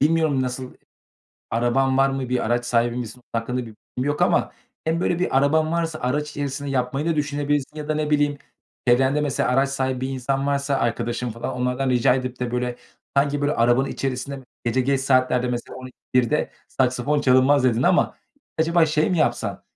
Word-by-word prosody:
bilmiyorum, 155 -3 +2
nasıl, 125 0 -5 0.8
araban 130 +3 +2
var 135 0 +4
mı, 135 -2 -3
bir 125 0 0
araç 120 +1 0
sahibi 120 0 +1
misin, 125 0 -6
hakkında 115 +2 -2
bir 120 - -7 0.3
bilgim 130 +3 -1
yok 145 - 0
ama - - +2 0.3
hem, 160 +1 0
böyle, 175 -1 0
bir 180 -7 0
araban 155 +3 +2
varsa 165 -2 -1
araç 150 +4 -1
içerisinde 145 -1 -4
yapmayı 135 +3 -1
da 165 -2 +1
düşünebilirsin 145 0 -1
ya 150 -1 -6
da, 155 - +1
ne 150 0 -1
bileyim, 145 -1 +2 0.5
çevrende, 130 +4 +4
mesela, 145 -4 0
araç 135 +2 +3
sahibi 130 -2 -2
bir 130 - -2
insan 135 +1 -1
varsa, 140 0 0
arkadaşın 120 0 -1
falan, 115 +1 -5
onlardan 125 +1 -1
rica 125 0 +4
edip 130 -1 -4
de, 125 - -2
böyle, 125 0 -2 0.4
sanki, 140 +1 +2
böyle, 145 +1 +1
arabanın 120 +3 +3
içerisinde 135 +1 -3 0.2
gece 120 +2 +1
geç 135 +1 +1
saatlerde 130 -2 +2
mesela, 120 0 -4
"12-1’de 130 +1 -1 0.2
saksafon 130 +3 +1
çalınmaz." 130 +1 +4
dedin 120 -1 +2
ama - - +2 0.4
acaba 165 0 +3
şey 155 +2 +1
mi 175 - +1
yapsan? - - 0
135 Hz, 180 wpm, -23 LUFS, 125-145 Hz, 0.8 s, var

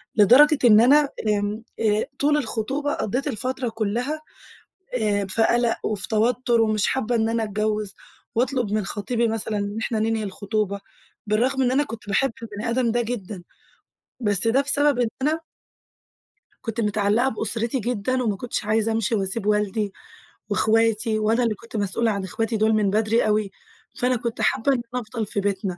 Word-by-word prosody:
لدرجة 265 +8 +7
إن 215 -2 +8
أنا 285 +3 +5 0.2
آمم، 210 +1 -1 0.2
آآ، 215 -1 +2
طُول 295 +1 +3
الخطوبة 270 +3 -2
قضّيت 250 +6 -2
الفترة 255 +2 -2
كُلّها 235 +8 -2 0.8
آآ 205 -2 +1
في 225 +3 +2
قَلَق 240 0 +2
وفي 210 -2 -2
توتُّر 235 +1 +2
ومش 215 -2 +1
حابّة 245 -2 0
إن 225 0 +1
أنا 230 -1 0
أتجوِّز 210 -1 -2 0.4
وأطلُب 245 -3 0
من 215 -2 0
خطيبي 230 +4 -1
مثلًا 220 -1 -2
إن 205 +1 -3
إحنا 220 -1 -1
ننهي 220 0 0
الخطوبة، 200 0 -2 0.5
بالرغم 255 +6 +1
إن 250 -1 +2
أنا 285 +3 +3
كنت 225 -6 -9
باحب 230 +6 +1
البني 215 +1 -5
آدم 235 -1 +1
ده 240 +1 +1
جدًا، 210 -6 -5 0.8
بس 205 0 +1
ده 260 +4 +3
بسبب 285 -1 +2
إن 235 - +2
أنا 310 +3 +1 1.2
كنت 225 -1 -3
متعلَّقة 210 +4 +1
بأسرتي 225 +2 -2
جدًا 250 +3 -1
وما 210 -4 0
كنتش 240 0 -4
عايزة 220 +1 +1
أمشِي 225 0 0
وأسيب 200 +1 -1
والدي 210 -1 0 0.6
وإخواتي، 220 0 +2
وأنا 225 +3 +2
اللي 220 -2 0
كنت 230 +1 -9
مسؤولة 210 +3 0
عن 200 -2 -3
إخواتي 225 +4 -2
دُول 220 +1 +3
من 210 -2 +2
بدري 220 +2 +2
أوي، 210 -2 +1 0.4
فأنا 250 +1 +1
كنت 235 0 -4
حابّة 275 +5 +2
إن 245 - -1
أنا 250 - -1
أفضَل 225 0 -4
في 205 0 -3
بيتنا. 195 -2 -2
225 Hz, 165 wpm, -23 LUFS, 210-245 Hz, 1.2 s, إن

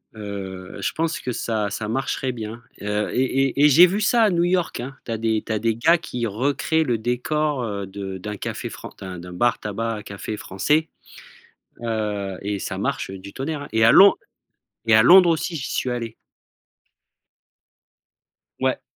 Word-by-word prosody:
heu, 100 -3 -7
je - - 0
pense 165 0 -2
que 125 - -3
ça, 110 -3 -1
ça 105 +1 -4
marcherait 130 +1 -2
bien, 115 0 -7 0.2
heu 105 +1 -1
et 125 - +2
et 135 +1 +2
et - - +7
et - - +7
j'ai 175 +6 +8
vu 200 +4 -1
ça 230 +3 +3
à 215 - +5
New 170 -1 +1
York, 175 -7 0
hein. 135 +2 -7
Tu 115 - -5
as 115 - -1
des 110 -1 0
tu - - -6
as 105 - 0
des 115 0 0
gars 165 +9 +4
qui 120 -7 -4
recréent 140 +8 0
le 120 -3 +1
décor, 130 +4 -1
heu, 100 -3 -4
de 95 -1 -6
d'un 105 +3 -6
café - - -5
fran - - -9
d'un 95 -2 -7
d'un 90 0 -9
bar-tabac, 115 0 -1
café 100 +1 -6
français, 150 +14 0 0.9
heu 105 -4 -2
et 100 0 -3
ça - - -4
marche, - - -2
heu, 95 - -7
du 100 +1 -11
tonnerre, 145 +2 -3
hein 145 - -9
et 110 0 +3
à 115 - +7
Lond 195 +1 +8 0.7
et 110 - +5
à 110 - +7
Londres, 180 +2 +8
aussi, 165 +1 -1
j'y 135 - -5
suis 125 - -1
allé. 115 -2 -4 2.4
Ouais. - - 0
115 Hz, 190 wpm, -23 LUFS, 105-145 Hz, 2.4 s, j'ai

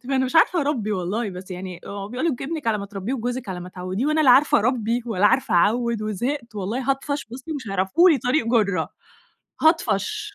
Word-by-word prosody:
فأنا 265 -1 +1
مش 260 +5 -1
عارفة 340 +2 +4
أربّي 255 -8 -1
والله، 200 +4 -2
بس 185 +1 -10
يعني 180 -1 -6
بيقولوا 210 +10 -3
ابنِك 300 -1 -5
على 220 -2 +1
ما 200 - -6
تربّيه 205 +5 -4
وجوزِك 245 -2 -4
على 180 -1 -4
ما 180 - -8
تعوّديه 185 +7 -3
وأنا 305 +1 +2
لا 275 - +6
عارفة 270 +4 +5
أربي 235 0 0
ولا 205 -2 +2
عارفة 260 -5 +2
أعوِّد 230 +4 +2
وزهقت، 235 +3 -3
والله 230 +7 -2
هاطفش 285 +1 -2
بُصّي 260 +6 -7
مش 270 -8 -6
هيعرفوا 195 - +3
لي 295 - +3
طريق 250 0 0
جُرّة، 215 -5 +1 0.7
هاطفش. 415 +6 +1
235 Hz, 190 wpm, -23 LUFS, 200-275 Hz, 0.7 s, لا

